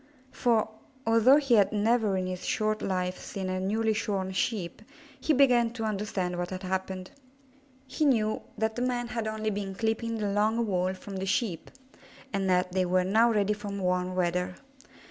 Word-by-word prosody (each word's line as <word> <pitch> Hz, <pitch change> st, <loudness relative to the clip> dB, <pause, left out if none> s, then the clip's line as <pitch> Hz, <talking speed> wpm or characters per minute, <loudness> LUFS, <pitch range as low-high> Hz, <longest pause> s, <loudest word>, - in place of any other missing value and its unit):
For, 230 Hz, -3 st, +2 dB, 0.4 s
although 230 Hz, +4 st, +6 dB
he 275 Hz, -4 st, +1 dB
had 205 Hz, -4 st, +5 dB
never 215 Hz, -1 st, +2 dB
in 185 Hz, -, -1 dB
his 185 Hz, 0 st, -5 dB
short 215 Hz, 0 st, 0 dB
life 185 Hz, -1 st, -2 dB
seen 190 Hz, -2 st, -5 dB
a 185 Hz, 0 st, -1 dB
newly 220 Hz, +4 st, +1 dB
shorn 195 Hz, -3 st, -2 dB
Sheep, 185 Hz, -1 st, -2 dB, 0.4 s
he -, -, 0 dB
began 250 Hz, -4 st, +4 dB
to 230 Hz, -2 st, -5 dB
understand 195 Hz, -4 st, -2 dB
what 175 Hz, 0 st, -2 dB
had 185 Hz, 0 st, -6 dB
happened. 185 Hz, 0 st, -3 dB, 0.7 s
He 270 Hz, +4 st, -2 dB
knew 220 Hz, -6 st, +2 dB, 0.2 s
that 220 Hz, 0 st, 0 dB
the 245 Hz, -, -3 dB
men 245 Hz, -1 st, -1 dB
had 230 Hz, -2 st, -3 dB
only 215 Hz, 0 st, -2 dB
been 195 Hz, -1 st, -4 dB
clipping 225 Hz, +2 st, -1 dB
the 205 Hz, -2 st, -1 dB
long 215 Hz, +3 st, +1 dB
wool 185 Hz, -2 st, 0 dB
from 195 Hz, +1 st, -8 dB
the 190 Hz, +1 st, -3 dB
Sheep, 200 Hz, -4 st, -1 dB, 0.6 s
and 195 Hz, -1 st, 0 dB
that 180 Hz, 0 st, +2 dB
they 185 Hz, 0 st, +1 dB
were 180 Hz, 0 st, +2 dB
now 220 Hz, +5 st, +4 dB
ready 210 Hz, -1 st, +2 dB
for 205 Hz, 0 st, -8 dB
warm 180 Hz, -2 st, -1 dB
weather. 180 Hz, 0 st, 0 dB
205 Hz, 180 wpm, -28 LUFS, 185-225 Hz, 0.7 s, although